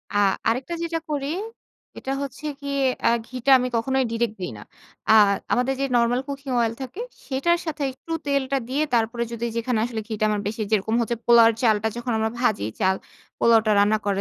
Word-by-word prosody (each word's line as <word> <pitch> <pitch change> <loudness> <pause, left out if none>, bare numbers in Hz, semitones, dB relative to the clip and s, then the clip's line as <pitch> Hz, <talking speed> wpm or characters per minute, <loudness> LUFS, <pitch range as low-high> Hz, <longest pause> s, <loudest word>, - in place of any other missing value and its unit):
আ - - +3 0.3
আরেকটা 255 +8 -2
যেটা 330 -1 -2
করি 280 -2 -2 0.7
এটা 265 - -4
হচ্ছে 275 +3 -8 0.2
গিয়ে 280 -1 -2 0.3
আ - - +6 0.2
ঘিটা 255 +1 0
আমি 250 - 0
কখনোই 265 +3 +1
ডিরেক্ট 230 -1 -1
দিই 180 - -3
না। 105 - -10 0.5
আ - - +8 0.4
আমাদের 250 +2 +1
যে - - +2
নরমাল 240 +2 +2
কুকিং 275 -1 -5
অয়েল 230 -1 +1
থাকে, 265 - -7 0.3
সেটার 320 +6 +1
সাথে 305 -2 -3
একটু 270 +5 -12
তেলটা 275 -1 0
দিয়ে 285 +4 +1
তারপরে 235 +1 +1
যদি 235 0 -3
যেখানে 230 -1 0
আসলে 225 -3 -4
ঘিটা 215 -1 -2
আমার 210 -1 0
বেশি 220 +2 -4
যেরকম 220 +2 +1
হচ্ছে 235 +1 -1
পোলাওয়ের 230 -1 +7
চালটা 220 -1 +3
যখন 240 +1 -3
আমরা 220 0 0
ভাজি, 215 - +1
চাল 190 0 +3 0.4
পোলাওটা 225 -2 +4
রান্না 210 +2 +4
করে 200 -1 0
240 Hz, 185 wpm, -24 LUFS, 220-270 Hz, 0.7 s, আ